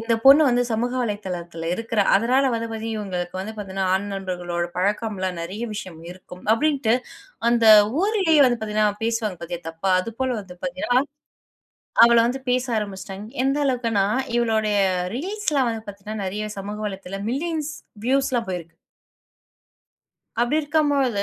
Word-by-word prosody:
இந்த 230 0 +1
பொண்ணு 280 +3 +9
வந்து 245 0 +3
சமூக 240 +3 0
வலைத்தளத்தில 175 -6 -4
இருக்கிறா. 230 0 0
அதனால 250 +6 +2
வந்து 230 0 -2
பார்த்தீங்கன்னா 225 0 -4
இவங்களுக்கு 180 -2 -4
வந்து 215 +3 -6
பாத்தீங்கன்னா 195 -2 -3
ஆண் 200 +2 -1
நண்பர்களோடு 175 -2 -3
பழக்கம் 205 +3 0
எல்லாம் 185 -2 -2
நிறைய 195 +7 -6
விஷயம் 185 -6 -7
இருக்கும், 180 0 -13
அப்படின்ட்டு 270 -3 +2 0.6
அந்த 235 -2 +3 0.4
ஊரிலேயே 380 -8 +3
வந்து 240 -2 0
பார்த்தீங்கன்னா 215 -1 +1
பேசுவாங்க 225 -4 -1
பாத்தியா 170 0 -5
தப்பா 165 +4 -2
அதுபோல 240 +5 -3
வந்து 185 -2 -12
பார்த்தீங்கன்னா, 270 -1 +1 1.0
அவள 235 0 +5
வந்து 265 +2 -3
பேச 250 0 +1
ஆரம்பிச்சுட்டாங்க. 195 0 -7 0.2
எந்த 275 +2 +1
அளவுக்குன்னா 230 -6 +1 0.3
இவளுடைய 220 -3 +1 0.4
ரீல்ஸ் 395 - -2
எல்லாம் 265 -4 +2
வந்து 225 -1 -6
பார்த்தீங்கன்னா, 205 +1 -6
நிறைய 210 +3 -3
சமூக 205 +2 -6
வலைத்தளத்தில 195 0 -6
மில்லியன்ஸ் 310 +1 -2 0.3
வியூஸ்லாம் 260 -3 +1
போயிருக்கு. 170 -2 -6 1.7
அப்டி 245 +6 +1
இருக்கும் 300 0 +1
பொழுது, 255 -8 +1
220 Hz, 140 wpm, -23 LUFS, 195-255 Hz, 1.7 s, பொண்ணு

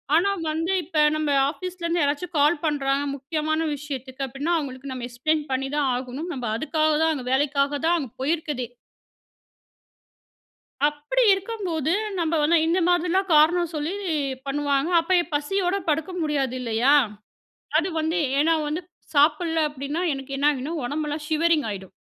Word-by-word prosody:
ஆனா 350 +5 +4 0.2
வந்து 325 +4 -1
இப்போ 310 -1 0
நம்ம 310 -1 0 0.2
ஆஃபீஸ்லேருந்து 345 +1 -3
யாராச்சும் 300 +4 -2
கால் 300 +3 +4
பண்ணுறாங்க 280 -2 +1
முக்கியமான 310 +3 -1
விஷயத்துக்கு 270 -2 -5
அப்படின்னா 280 +7 -2
அவங்களுக்கு 275 -2 -5
நம்ம 250 -2 -5
எக்ஸ்ப்ளைன் 300 +6 0
பண்ணி 270 +1 -1
தான் 280 -3 +2
ஆகணும். 260 +7 -5
நம்ம 255 -3 -5
அதுக்காக 310 +3 +1
தான் 320 0 +3
அங்க 265 -5 -5
வேலைக்காக 280 +1 +1
தான் 345 +1 +3
அங்க 265 -7 -6
போயிருக்குதே. 295 -4 -1 2.2
அப்படி 295 +13 0
இருக்கும்போது 380 - -2 0.3
நம்ம 330 -2 0
வந்து 330 +3 +4
இந்த 345 +3 +2
மாதிரிலாம் 355 +2 +1
காரணம் 340 +3 +4
சொல்லி 305 +4 -2 0.5
பண்ணுவாங்க 280 +1 0
அப்போ 335 +3 0
இப்போ 325 -3 -5
பசியோட 360 +5 -1
படுக்க 315 +4 0
முடியாது 280 -5 0
இல்லையா? 240 +4 +3 0.8
அது 335 - +2
வந்து 320 +3 0 0.2
ஏன்னா 325 +3 +4
வந்து 310 +4 -2 0.3
சாப்பிடல 320 +3 +3
அப்படினா 290 +3 -4
எனக்கு 270 0 -6
என்ன 285 +2 +4
ஆகினா 280 +2 -4
உடம்பெல்லாம் 295 +3 -3
ஷிவரிங் 315 -2 +2
ஆயிடும். 190 -2 -7
300 Hz, 140 wpm, -24 LUFS, 275-330 Hz, 2.2 s, ஆனா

